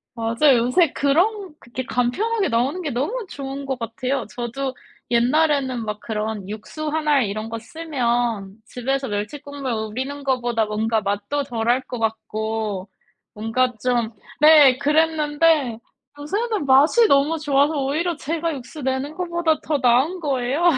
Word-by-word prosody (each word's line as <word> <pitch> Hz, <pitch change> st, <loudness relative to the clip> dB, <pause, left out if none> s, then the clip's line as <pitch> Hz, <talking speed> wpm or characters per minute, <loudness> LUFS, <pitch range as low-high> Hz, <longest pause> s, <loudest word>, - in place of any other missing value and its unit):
맞아요. 235 Hz, +4 st, +3 dB
요새 330 Hz, +3 st, +3 dB
그런 360 Hz, +6 st, +1 dB
그렇게 255 Hz, +1 st, -6 dB
간편하게 390 Hz, -, 0 dB
나오는 265 Hz, +10 st, 0 dB
게 310 Hz, -, -3 dB
너무 310 Hz, -, -2 dB
좋은 275 Hz, 0 st, -6 dB
것 265 Hz, -2 st, -3 dB
같아요. 250 Hz, +3 st, -2 dB
저도 255 Hz, +2 st, -3 dB, 0.4 s
옛날에는 260 Hz, -1 st, +2 dB
막 210 Hz, 0 st, -4 dB
그런 215 Hz, -2 st, -4 dB
육수 300 Hz, +9 st, -5 dB
1 310 Hz, 0 st, -2 dB
알 285 Hz, -4 st, +4 dB
이런 215 Hz, +2 st, -4 dB
거 230 Hz, -, -4 dB
쓰면 235 Hz, -6 st, -2 dB
집에서 270 Hz, +3 st, -2 dB
멸치 210 Hz, +7 st, -3 dB
국물 285 Hz, -2 st, -5 dB
우리는 255 Hz, +6 st, -4 dB
거보다 240 Hz, -4 st, 0 dB
뭔가 220 Hz, +1 st, 0 dB
맛도 205 Hz, +8 st, -2 dB
덜할 240 Hz, 0 st, 0 dB
것 245 Hz, -2 st, -6 dB
같고 220 Hz, -2 st, -3 dB, 0.4 s
뭔가 235 Hz, +4 st, 0 dB
좀 240 Hz, -3 st, +1 dB, 0.3 s
네 300 Hz, -4 st, +8 dB
그랬는데 300 Hz, -3 st, +2 dB, 0.4 s
요새는 410 Hz, +4 st, -2 dB
맛이 295 Hz, -, +5 dB
너무 285 Hz, +4 st, +3 dB
좋아서 290 Hz, 0 st, +2 dB
오히려 320 Hz, +5 st, -1 dB
제가 330 Hz, +2 st, -2 dB
육수 275 Hz, +3 st, -9 dB
내는 265 Hz, +3 st, -2 dB
것보다 345 Hz, -3 st, 0 dB
더 305 Hz, -, 0 dB
나은 260 Hz, +8 st, +2 dB
거예요. 275 Hz, 0 st, -1 dB
265 Hz, 290 characters per minute, -22 LUFS, 230-300 Hz, 0.4 s, 네